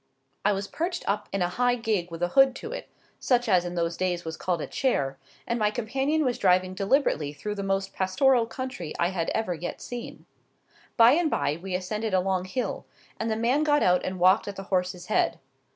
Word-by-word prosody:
I 205 Hz, -, +4 dB
was 195 Hz, 0 st, -2 dB
perched 340 Hz, -, -3 dB
up 205 Hz, +1 st, -1 dB
in 195 Hz, -2 st, 0 dB
a -, -, +2 dB
high 245 Hz, +7 st, +1 dB
gig 215 Hz, -7 st, -1 dB
with 165 Hz, +1 st, -5 dB
a 175 Hz, -, +1 dB
hood 270 Hz, +5 st, +5 dB
to 450 Hz, -, -7 dB
it, -, -, -6 dB, 0.3 s
such 245 Hz, -1 st, +2 dB
as 180 Hz, -4 st, +3 dB
in 175 Hz, 0 st, -4 dB
those 170 Hz, 0 st, -1 dB
days 180 Hz, -2 st, -1 dB
was 160 Hz, 0 st, -4 dB
called 175 Hz, 0 st, -1 dB
a -, -, -3 dB
chair, 140 Hz, -, -1 dB, 0.3 s
and 235 Hz, 0 st, -1 dB
my 210 Hz, -1 st, +3 dB
companion 270 Hz, +7 st, 0 dB
was 250 Hz, -2 st, 0 dB
driving 185 Hz, -1 st, +3 dB
deliberately 195 Hz, -, +1 dB
through 205 Hz, +9 st, -4 dB
the 200 Hz, -, -4 dB
most 195 Hz, 0 st, -1 dB
pastoral 230 Hz, +6 st, +2 dB
country 250 Hz, -, -5 dB
I 170 Hz, -, +2 dB
had 175 Hz, -3 st, -2 dB
ever 220 Hz, -5 st, 0 dB
yet 175 Hz, +1 st, -5 dB
seen. 245 Hz, -1 st, -8 dB, 0.7 s
By 230 Hz, 0 st, +8 dB
and 320 Hz, +3 st, +3 dB
by 150 Hz, -, 0 dB
we 190 Hz, -1 st, -3 dB
ascended 210 Hz, +3 st, -2 dB
a -, -, +4 dB
long 185 Hz, 0 st, 0 dB
hill, 245 Hz, +7 st, -3 dB, 0.4 s
and 225 Hz, -, -1 dB
the 220 Hz, -, 0 dB
man 240 Hz, +6 st, +2 dB
got 295 Hz, -1 st, +3 dB
out 180 Hz, 0 st, +3 dB
and 185 Hz, -, -3 dB
walked 185 Hz, +4 st, +4 dB
at 200 Hz, -, -5 dB
the 195 Hz, -, -6 dB
horse's 180 Hz, -1 st, 0 dB
head. 215 Hz, -, +1 dB
195 Hz, 215 wpm, -26 LUFS, 180-245 Hz, 0.7 s, By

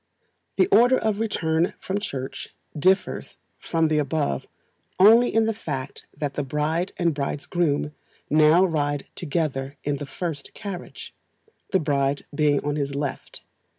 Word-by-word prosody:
The -, -, +5 dB
order 250 Hz, -, +6 dB
of 215 Hz, -2 st, 0 dB
return 170 Hz, -6 st, 0 dB
from 195 Hz, +2 st, -2 dB
Church 135 Hz, -10 st, -5 dB, 0.3 s
differs 185 Hz, +6 st, +1 dB, 0.2 s
from 165 Hz, -1 st, +1 dB
the 155 Hz, -1 st, +2 dB
above 145 Hz, -, -1 dB, 0.5 s
only 225 Hz, +5 st, +7 dB
in 225 Hz, 0 st, +3 dB
the 225 Hz, -, +1 dB
fact 140 Hz, -11 st, -6 dB
that 145 Hz, -1 st, -2 dB
the 145 Hz, -, -2 dB
bride 150 Hz, +6 st, -1 dB
and 170 Hz, -2 st, +2 dB
bridegroom 145 Hz, +1 st, -1 dB, 0.3 s
now 155 Hz, +4 st, +5 dB
ride 145 Hz, -4 st, -1 dB
together 145 Hz, -4 st, -2 dB
in 145 Hz, -1 st, -1 dB
the 145 Hz, 0 st, -6 dB
first 155 Hz, -1 st, -5 dB
carriage, 195 Hz, -4 st, -7 dB, 0.6 s
the 190 Hz, -, +2 dB
bride 140 Hz, -2 st, 0 dB
being 145 Hz, -1 st, +2 dB
on 145 Hz, 0 st, -1 dB
his 140 Hz, -1 st, -2 dB
left. 140 Hz, -1 st, -5 dB
155 Hz, 140 wpm, -24 LUFS, 145-180 Hz, 0.6 s, only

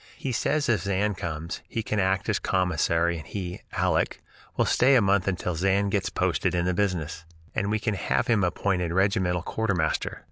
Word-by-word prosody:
He 135 Hz, -, -3 dB
says 145 Hz, +5 st, 0 dB
if 115 Hz, -7 st, +2 dB
Zan 100 Hz, +2 st, 0 dB
comes 85 Hz, -2 st, -5 dB
he 115 Hz, -, -2 dB
can 105 Hz, -1 st, -1 dB
act 95 Hz, 0 st, +1 dB
as 105 Hz, -3 st, +1 dB
commissary 85 Hz, -2 st, +1 dB
and 75 Hz, -, -11 dB
he 90 Hz, -3 st, -5 dB, 0.2 s
(Aleck) -, -, +1 dB, 0.4 s
will -, -, +3 dB
stay 135 Hz, +2 st, +4 dB
a -, -, +7 dB
month 100 Hz, -2 st, +2 dB
until 90 Hz, -1 st, -1 dB
Zan 95 Hz, +4 st, +1 dB
gets 100 Hz, -1 st, 0 dB
posted 90 Hz, 0 st, 0 dB
in 85 Hz, 0 st, +1 dB
the 90 Hz, -, +1 dB
business; 85 Hz, -5 st, -1 dB, 0.3 s
and 100 Hz, -, -1 dB
we 110 Hz, -, +1 dB
can 110 Hz, 0 st, -1 dB
have 100 Hz, +4 st, 0 dB
him 115 Hz, -6 st, +2 dB
appointed 90 Hz, -1 st, 0 dB
regimental 95 Hz, -2 st, +1 dB
quartermaster. 95 Hz, -8 st, -1 dB
95 Hz, 185 wpm, -26 LUFS, 90-105 Hz, 0.4 s, a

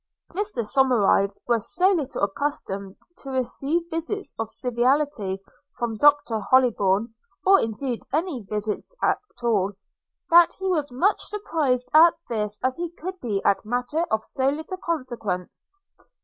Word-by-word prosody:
Mr 395 Hz, -, -2 dB
Somerive 215 Hz, -6 st, +3 dB
was 235 Hz, -3 st, -1 dB
so 365 Hz, +2 st, +5 dB
little 300 Hz, -, -2 dB
accustomed 200 Hz, -4 st, -3 dB, 0.2 s
to 275 Hz, -, -9 dB
receive 270 Hz, +5 st, 0 dB
visits 335 Hz, +6 st, -3 dB
of 225 Hz, -1 st, -2 dB
civility 245 Hz, -4 st, 0 dB, 0.4 s
from 235 Hz, -2 st, -2 dB
Doctor 290 Hz, -4 st, +4 dB
Hollybourn, 225 Hz, -3 st, +2 dB, 0.3 s
or 390 Hz, +1 st, +7 dB
indeed 230 Hz, +2 st, -2 dB
any 310 Hz, -3 st, -1 dB
visits 210 Hz, -, -4 dB
at -, -, +2 dB, 0.2 s
all, 205 Hz, -4 st, +1 dB, 0.6 s
that 345 Hz, 0 st, +7 dB
he 385 Hz, -, -6 dB
was 330 Hz, -6 st, +1 dB
as -, -, -17 dB
much 360 Hz, +12 st, +2 dB
surprised 310 Hz, -12 st, -1 dB
at 325 Hz, +2 st, +7 dB
this 210 Hz, -2 st, -2 dB
as 255 Hz, 0 st, +1 dB
he 345 Hz, 0 st, -3 dB
could 365 Hz, +3 st, -7 dB
be 210 Hz, -, -2 dB
at 200 Hz, -, +2 dB
a -, -, -17 dB
matter 245 Hz, +7 st, -1 dB
of 220 Hz, 0 st, 0 dB
so 265 Hz, 0 st, 0 dB
little 315 Hz, +6 st, -4 dB
consequence. 240 Hz, -, -4 dB
255 Hz, 145 wpm, -24 LUFS, 220-320 Hz, 0.6 s, or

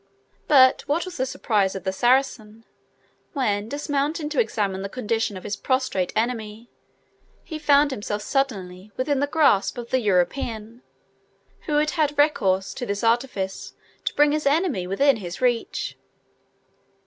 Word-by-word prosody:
But 260 Hz, -3 st, +6 dB
what 315 Hz, +5 st, 0 dB
was 370 Hz, -, -8 dB
the 260 Hz, -, -1 dB
surprise 205 Hz, -6 st, 0 dB
of 190 Hz, -, -6 dB
the 190 Hz, 0 st, -2 dB
Saracen, 235 Hz, -2 st, 0 dB, 0.7 s
when, 215 Hz, -7 st, -1 dB
dismounting 290 Hz, +2 st, -2 dB
to 300 Hz, -, -1 dB
examine 205 Hz, -4 st, 0 dB
the 195 Hz, -, -4 dB
condition 225 Hz, -3 st, -2 dB
of 185 Hz, -, -10 dB
his 210 Hz, -, -3 dB
prostrate 255 Hz, -8 st, -1 dB
enemy, 225 Hz, 0 st, -3 dB, 0.7 s
he 315 Hz, -2 st, -7 dB
found 290 Hz, -1 st, +4 dB
himself 210 Hz, -3 st, -4 dB
suddenly 200 Hz, -8 st, -2 dB
within 265 Hz, +2 st, 0 dB
the 285 Hz, -, +1 dB
grasp 285 Hz, -11 st, +2 dB
of 235 Hz, -1 st, -7 dB
the 260 Hz, -, +3 dB
European, 220 Hz, +3 st, -1 dB, 0.9 s
who 305 Hz, -, -1 dB
had 300 Hz, +1 st, +2 dB
had 300 Hz, -4 st, 0 dB
recourse 195 Hz, -10 st, +2 dB
to 250 Hz, -, -5 dB
this 200 Hz, +1 st, -3 dB
artifice 225 Hz, -5 st, -1 dB, 0.3 s
to -, -, -2 dB
bring 295 Hz, 0 st, +4 dB
his 300 Hz, -1 st, 0 dB
enemy 285 Hz, -, +1 dB
within 275 Hz, +8 st, +3 dB
his 180 Hz, -3 st, -7 dB
reach! 245 Hz, -2 st, -1 dB
240 Hz, 150 wpm, -24 LUFS, 205-285 Hz, 0.9 s, But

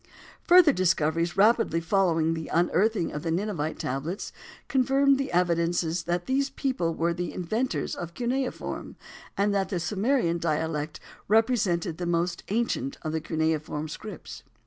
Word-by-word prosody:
Further 350 Hz, -4 st, +7 dB
discoveries 170 Hz, -2 st, +1 dB
rapidly 215 Hz, -4 st, +4 dB
following 165 Hz, -2 st, +2 dB
the 160 Hz, -1 st, -5 dB
unearthing 180 Hz, +3 st, +1 dB
of 150 Hz, -, -5 dB
the 165 Hz, -, -3 dB
Ninevite 165 Hz, -3 st, -2 dB
tablets, 140 Hz, +9 st, -4 dB, 0.3 s
confirmed 270 Hz, +1 st, +3 dB
the 275 Hz, -, -2 dB
evidences 170 Hz, -1 st, +1 dB
that 175 Hz, 0 st, -1 dB
these 275 Hz, +1 st, +1 dB
people 255 Hz, -12 st, -1 dB
were 170 Hz, +1 st, 0 dB
the 175 Hz, 0 st, -4 dB
inventors 220 Hz, +9 st, -2 dB
of 170 Hz, -1 st, -6 dB
cuneiform, 250 Hz, +2 st, -3 dB, 0.4 s
and 200 Hz, +1 st, +2 dB
that 195 Hz, -1 st, 0 dB
the 185 Hz, -, -1 dB
Sumerian 195 Hz, 0 st, 0 dB
dialect 155 Hz, -1 st, -2 dB, 0.3 s
represented 200 Hz, -7 st, +2 dB
the 175 Hz, -, -2 dB
most 170 Hz, +1 st, 0 dB
ancient 220 Hz, -, -1 dB
of 155 Hz, -, -2 dB
the 160 Hz, 0 st, -2 dB
cuneiform 160 Hz, -1 st, -1 dB
scripts. 210 Hz, +7 st, -8 dB
175 Hz, 140 wpm, -27 LUFS, 165-220 Hz, 0.4 s, Further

